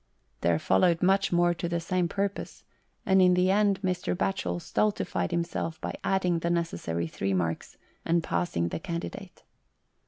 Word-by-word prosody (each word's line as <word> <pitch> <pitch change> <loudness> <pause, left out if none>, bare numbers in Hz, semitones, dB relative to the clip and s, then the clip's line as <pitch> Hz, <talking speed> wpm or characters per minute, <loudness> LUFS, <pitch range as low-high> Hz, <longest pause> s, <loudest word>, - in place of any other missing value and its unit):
There 85 +3 +2
followed 165 - +2
much 195 +1 +3
more 175 0 +3
to 170 0 -4
the 170 0 0
same 180 +1 0
purpose, 200 +2 -3 0.4
and 190 -1 +4
in 180 -1 +5
the 180 +1 +3
end 200 -1 +3
Mr. 180 -1 -1
Batchel 90 - -1
stultified 210 - -1
himself 170 -1 -2
by - - -4
adding 180 -3 +1
the 170 - -1
necessary 165 - -1
three 95 +4 -2
marks, 85 -3 -2 0.3
and 165 0 +1
passing 85 - -1
the - - -4
candidate. 170 - -6
175 Hz, 155 wpm, -28 LUFS, 160-185 Hz, 0.4 s, in